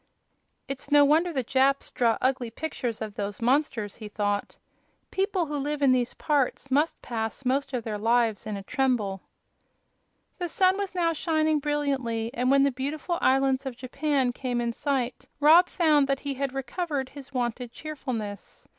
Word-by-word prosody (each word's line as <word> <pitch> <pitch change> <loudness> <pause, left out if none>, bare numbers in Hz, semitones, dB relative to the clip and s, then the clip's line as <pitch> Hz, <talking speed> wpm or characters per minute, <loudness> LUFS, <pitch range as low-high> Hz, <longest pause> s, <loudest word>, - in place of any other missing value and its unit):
"It's 275 0 -5
no 290 0 +7
wonder 320 +5 +3
the 265 -5 -1
Japs 270 +3 +2
draw 230 -2 +2
ugly 255 -2 +1
pictures 240 -4 -4
of 215 -2 -6
those 200 -1 -4
monsters," 235 -4 0
he 215 -2 -8
thought. 205 -1 -2 0.5
"People 385 -2 0
who 295 -1 -3
live 290 +1 -2
in 270 - +6
these 250 -1 +1
parts 275 -2 0
must 295 +5 +2
pass 225 +2 -4
most 275 +3 0
of 250 -3 -2
their 215 -2 -4
lives 225 -1 +1
in 210 -2 -3
a 195 - -7
tremble." 215 -6 0 1.2
The 350 -1 -2
sun 370 +2 +3
was 395 -2 -3
now 335 -2 +2
shining 315 -1 +1
brilliantly, 270 -6 -1
and 250 0 0
when 275 0 +5
the 280 - +3
beautiful 295 +7 -3
islands 270 0 +2
of 250 -3 -6
Japan 265 0 0
came 245 -1 -2
in 235 -1 -1
sight 260 -2 -2
Rob 325 +5 +7
found 305 -5 +3
that 275 -1 0
he 285 -1 -2
had 275 0 -2
recovered 270 +1 -3
his 285 -1 -11
wonted 245 -1 -2
cheerfulness. 245 -8 -6
270 Hz, 170 wpm, -27 LUFS, 240-295 Hz, 1.2 s, no